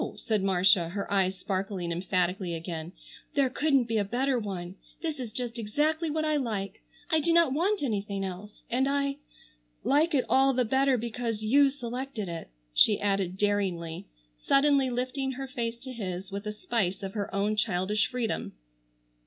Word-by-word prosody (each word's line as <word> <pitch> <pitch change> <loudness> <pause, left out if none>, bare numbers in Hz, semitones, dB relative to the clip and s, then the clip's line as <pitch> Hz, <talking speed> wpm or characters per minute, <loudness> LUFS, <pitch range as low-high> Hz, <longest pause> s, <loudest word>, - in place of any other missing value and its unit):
said 215 -3 -1
Marcia, 185 -2 +4
her 200 +2 -4
eyes 190 -1 +2
sparkling 185 -2 -2
emphatically 180 0 0
again. 165 0 -5 0.4
"There 275 -3 +3
couldn't 275 -1 +3
be 225 -2 0
a - - +2
better 250 +5 0
one. 190 -3 -5 0.3
This 315 -4 -2
is 240 -4 -5
just 240 0 -4
exactly 305 +9 0
what 310 +1 0
I 305 -1 +2
like. 210 -7 -3 0.3
I 320 - +4
do 335 +3 +1
not 335 -5 +4
want 375 +5 +1
anything 200 -5 -1
else. 190 +3 -8
And 260 +3 +1
I—like 280 - -1
it 260 - +2
all 270 +1 +4
the 250 -1 +2
better 265 +2 +3
because 230 -1 -3
you 275 +6 +5
selected 250 -4 -5
it," 170 -1 -6 0.2
she 205 - +5
added 195 -2 0
daringly, 190 -5 -1 0.3
suddenly 275 - +4
lifting 255 +2 -2
her 270 +1 -5
face 235 -2 -3
to 260 +2 -9
his 190 -5 -5
with 200 +2 -5
a - - -1
spice 205 -3 -2
of 195 0 -4
her 205 -2 -3
own 205 +2 +1
childish 210 0 +1
freedom. 250 -3 -2
220 Hz, 165 wpm, -29 LUFS, 195-270 Hz, 0.4 s, you